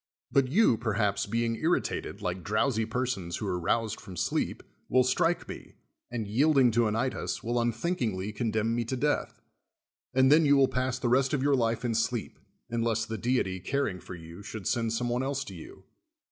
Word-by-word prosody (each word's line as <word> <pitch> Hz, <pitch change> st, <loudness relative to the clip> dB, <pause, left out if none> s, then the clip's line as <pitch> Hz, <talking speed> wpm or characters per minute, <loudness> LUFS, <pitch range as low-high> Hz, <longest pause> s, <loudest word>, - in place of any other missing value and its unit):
But 135 Hz, -1 st, +4 dB
3'ou, 145 Hz, -, +4 dB
perhaps, 105 Hz, -3 st, 0 dB
being 115 Hz, 0 st, 0 dB
irritated, 165 Hz, +6 st, -1 dB
like 90 Hz, 0 st, -3 dB
drowsy 110 Hz, +2 st, +1 dB
persons 115 Hz, -8 st, -2 dB
who -, -, -4 dB
are 90 Hz, -, -1 dB
roused 110 Hz, +5 st, 0 dB
from 90 Hz, -2 st, -10 dB
sleep, 90 Hz, -, -1 dB, 0.3 s
will 130 Hz, +1 st, +5 dB
strike 165 Hz, +7 st, +1 dB
me, -, -, -9 dB, 0.3 s
and, 115 Hz, -3 st, -3 dB
yielding 135 Hz, +3 st, +4 dB
to 115 Hz, +1 st, +3 dB
Anytus, 115 Hz, +5 st, -2 dB
will 120 Hz, +1 st, 0 dB
unthinkingly 115 Hz, -, -1 dB
condemn 110 Hz, 0 st, 0 dB
me 120 Hz, 0 st, 0 dB
to 130 Hz, +3 st, -3 dB
death; 145 Hz, +3 st, -1 dB, 0.7 s
and 130 Hz, +1 st, +4 dB
then 160 Hz, +2 st, +7 dB
you 145 Hz, -1 st, +5 dB
Avill 135 Hz, -1 st, +4 dB
pass 130 Hz, 0 st, -1 dB
the 125 Hz, -, -2 dB
rest 135 Hz, +4 st, +3 dB
of 135 Hz, -, -1 dB
your 140 Hz, 0 st, +4 dB
life 115 Hz, -1 st, 0 dB
in 120 Hz, -, 0 dB
sleep, 115 Hz, +1 st, -2 dB, 0.3 s
unless 115 Hz, -1 st, 0 dB
the 110 Hz, 0 st, -5 dB
deity, 115 Hz, -7 st, 0 dB
caring 100 Hz, -1 st, -1 dB
for 90 Hz, -, -9 dB
you, 85 Hz, +2 st, -11 dB
should 105 Hz, -1 st, -7 dB
send 115 Hz, +1 st, 0 dB
some 120 Hz, +2 st, -1 dB
one 120 Hz, +1 st, 0 dB
else 140 Hz, +1 st, -1 dB
to -, -, -9 dB
you. 370 Hz, +5 st, -11 dB
120 Hz, 190 wpm, -29 LUFS, 110-130 Hz, 0.7 s, then